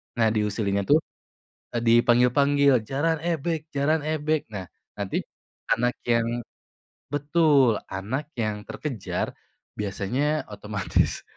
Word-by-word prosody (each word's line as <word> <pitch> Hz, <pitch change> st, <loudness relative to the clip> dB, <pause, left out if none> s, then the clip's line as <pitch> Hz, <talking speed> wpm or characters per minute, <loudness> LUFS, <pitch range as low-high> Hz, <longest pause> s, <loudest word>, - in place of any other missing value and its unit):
Nah, 115 Hz, -2 st, +3 dB
diusillinya 105 Hz, -2 st, 0 dB
tuh, 150 Hz, +2 st, +6 dB, 0.8 s
e -, -, +1 dB
dipanggil-panggil, 125 Hz, +3 st, +4 dB
"Jaran 160 Hz, +4 st, +1 dB
ebeg 165 Hz, -1 st, -2 dB
jaran 150 Hz, +3 st, +2 dB
ebeg." 155 Hz, 0 st, 0 dB
Nah, 100 Hz, -4 st, -6 dB, 0.3 s
nanti -, -, -2 dB, 0.5 s
anak 120 Hz, +2 st, +2 dB
yang 115 Hz, -1 st, +3 dB, 0.8 s
betul, 145 Hz, -5 st, +3 dB
anak 115 Hz, +10 st, -4 dB
yang 110 Hz, -2 st, -1 dB
terkejar 130 Hz, -9 st, -3 dB, 0.5 s
biasanya 125 Hz, +9 st, -1 dB
otomatis 105 Hz, -2 st, -1 dB
125 Hz, 100 wpm, -25 LUFS, 110-150 Hz, 0.8 s, tuh